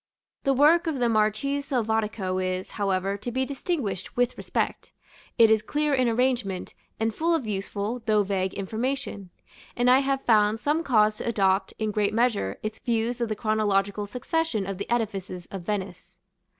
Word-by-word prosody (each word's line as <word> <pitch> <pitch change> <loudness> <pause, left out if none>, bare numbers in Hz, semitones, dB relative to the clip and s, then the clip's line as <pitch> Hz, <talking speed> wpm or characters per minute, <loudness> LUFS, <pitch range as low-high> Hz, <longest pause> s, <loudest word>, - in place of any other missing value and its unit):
The 275 - +4
work 325 +5 +5
of 315 -4 -1
the 245 -2 +2
Marchese 225 +6 +1
Selvatico 220 -6 -1
is, 185 0 -2
however, 195 -1 -1
to 240 +4 -5
be 260 +2 0
distinguished 260 - -3
with 245 0 +2
respect; - - -3 0.5
it 225 -1 +7
is 220 -1 +4
clear 295 +6 0
in 255 -3 +3
arrangement, 235 -6 0 0.3
and 225 0 0
full 335 +7 +1
of 295 -7 -2
useful, 205 +3 -3
though 210 -1 +4
vague, 190 -1 -1
information; 220 -1 -3 0.5
and 245 +1 +3
I 260 - +7
have 275 0 -1
found 215 -1 +4 0.3
cause 215 -4 +3
to - - -5
adopt, 195 -3 +1
in 215 -1 -1
great 210 0 0
measure, 225 - +1
its 215 0 -4
views 235 0 -1
of 235 - 0
the 215 - -1
chronological 205 -2 0
succession 250 -1 -1
of 195 -1 -5
the 200 - -5
edifices 195 -6 -2
of 195 - -5
Venice. 190 -1 -5
215 Hz, 165 wpm, -26 LUFS, 200-250 Hz, 0.5 s, it